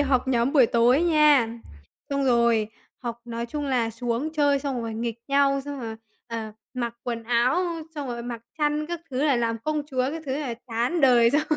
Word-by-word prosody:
học 265 -2 +1
nhóm 245 +1 +2
buổi 265 -6 +6
tối 240 +7 +4
nha, 300 -7 +5 0.6
xong 280 -1 0
rồi 235 -3 +3 0.3
học 235 -1 -5
nói 235 0 -4
chung 295 +3 -4
là 240 -4 +1
xuống 240 +6 -2
chơi 285 -2 +3
xong 270 -3 -3
rồi 225 -1 -4
nghịch 230 0 -3
nhau, 275 0 +3
xong 285 -2 -6
rồi, 225 -1 -5 0.3
ờ, 225 -2 -5 0.2
mặc 235 -2 -3
quần 235 -2 -3
áo, 240 +2 +2
ơ, 345 -3 -1
xong 285 -3 -4
rồi 235 -1 -4
mặc 235 -1 -6 0.2
khăn 300 0 +1
các 345 -1 -4
thứ 265 +3 0
là 280 -4 +3
làm 230 -1 0
công 305 +4 -2
chúa 260 -3 -1
các 325 -1 -6
thứ 265 +2 -1
là 260 -6 -3
chán 240 +9 0
đời 240 -4 +6
xong 295 +2 +3
255 Hz, 205 wpm, -25 LUFS, 235-290 Hz, 0.6 s, buổi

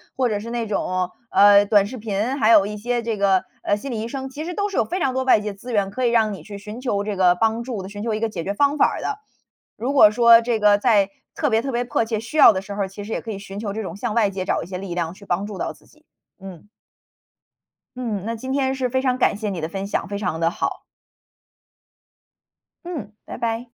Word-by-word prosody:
或 255 -2 +1
者 210 -2 -1
是 230 +3 -7
那 235 -1 -2
种， 185 -3 -1 0.2
呃， 205 0 +7
短 200 -1 +4
视 255 - -7
频， 220 +4 -2
还 225 -4 +4
有 205 -3 +6
一 210 0 -5
些 240 +3 -1
这 230 -2 -3
个， 195 -2 +3 0.2
呃， 205 - +2
心 240 +7 -7
理 230 - -3
医 225 - -4
生， 265 +2 -5
其 295 +4 -6
实 355 - -4
都 405 +2 -1
是 395 - -5
有 - - +3
非 360 +3 -3
常 265 -6 0
多 260 - 0
外 260 -4 +5
界 210 0 -4
资 240 +5 -8
源 200 -3 +1
可 250 +6 -2
以 235 - +3
让 220 -2 +3
你 180 -6 -9
去 200 +1 -9
寻 210 +3 -8
求 210 -6 -1
这 210 0 -3
个 185 -2 +4
帮 225 +5 0
助 235 -5 -5
的， 190 - -8
寻 205 0 -7
求 225 -1 -1
一 215 - -2
个 225 0 -1
解 170 - -5
决 200 - -2
方 285 +7 +2
法 - - +5
儿 - - -4
的。 420 - -3 0.6
如 250 +5 -2
果 215 -7 +7
说 235 +1 +7
这 235 -1 -1
个 210 -1 +5
在 205 -3 +3 0.2
特 295 - 0
别 225 -1 +2
特 270 - -3
别 240 0 0
迫 230 -1 0
切 220 -1 -2
需 230 +8 -6
要 260 - +9
的 190 - -2
时 200 +1 -8
候， 200 -1 -1
其 195 +2 -9
实 220 +2 -5
也 - - -2
可 225 - -6
以 200 - -6
寻 195 0 -9
求 205 -2 -4
这 220 - -3
种 185 -5 -6
向 205 - -3
外 220 -3 +3
界 190 -1 -4
找 - - 0
一 - - -8
些 185 0 -5
力 185 -1 -6
量 170 -2 -2
去 200 - -15
帮 195 +2 -1
助 205 -2 -7
到 - - -3
自 - - -23
己。 - - -25 0.3
嗯。 190 -2 -11 1.3
嗯， 225 -6 -3
那 230 - -2
今 260 +4 -5
天 265 -1 +1
是 260 -1 -1
非 260 +1 0
常 255 -1 +1
感 255 - +2
谢 210 0 -3
你 190 -4 -4
的 160 - -3
分 195 +3 -5
享， 200 - -2
非 200 +2 -4
常 180 -5 -2
的 165 0 +2
好。 - - -3 2.0
嗯， 290 - -6
拜 - - -7
拜。 230 +1 -3
215 Hz, 290 characters per minute, -22 LUFS, 200-245 Hz, 2.0 s, 要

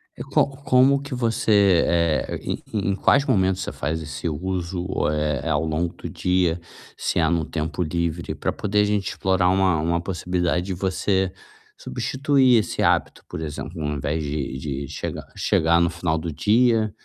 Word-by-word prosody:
E - - -6
co - - +2 0.2
como 135 0 +4
que 145 -1 -7
você, 105 -6 +3
eh, 85 -2 +1
em - - -4 0.3
em - - 0
quais 140 +7 +3
momentos 95 -6 +2
você - - -4
faz 80 +3 -3
esse 75 +2 -5
uso, 90 +2 -3 0.2
eh, 75 -3 -1
é 80 - -2
ao 75 0 +1
longo 80 +2 -1
do - - -8
dia, 90 -2 +1 0.4
se - - -1
é 80 -1 +3
no 85 -3 +1
tempo 80 +2 -3
livre, 85 +1 -2
pra - - -2
poder 105 0 -1
a - - +4
gente 105 -2 0
explorar 95 -1 +1
uma 95 -4 +3
uma 85 +2 0
possibilidade 90 -1 -1
de 95 - -3
você 95 +1 0 0.5
substituir 130 - +2
esse 105 - -3
hábito, - - +1
por - - -5
exemplo, 80 +2 -6
ao 75 - -1
invés 75 +2 -2
de 70 -2 -3
de 70 -1 -4
chegar - - -6
chegar 85 +1 +2
no 85 0 +3
final 85 -2 -1
do 80 +1 -4
dia, 110 +4 +3
85 Hz, 175 wpm, -23 LUFS, 80-100 Hz, 0.5 s, como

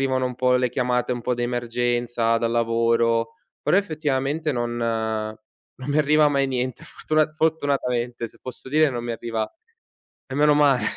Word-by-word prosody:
arrivano 130 -1 +1
un 125 - -5
po' 125 +1 +2
le 125 0 +1
chiamate 125 0 0
un 120 - -4
po' 125 - 0
d'emergenza 120 -1 0
dal 115 0 0
lavoro. 115 0 +1 0.3
Però, - - +3
effettivamente, 155 -4 0
non 120 -1 -2 1.0
non 130 +2 -5
mi 145 - +2
arriva 150 0 +4
mai 140 -1 +1
niente. 130 -2 -3
Fortuna 155 -1 0
fortunatamente, 125 -7 0
se - - -19
posso 130 0 -9
dire, 155 +3 +4
non 120 -2 -4
mi 120 - -2
arriva 115 -1 -3 0.8
e 130 - -7
meno 150 +1 +4
male. 145 -3 +4
125 Hz, 160 wpm, -23 LUFS, 120-145 Hz, 1.0 s, arriva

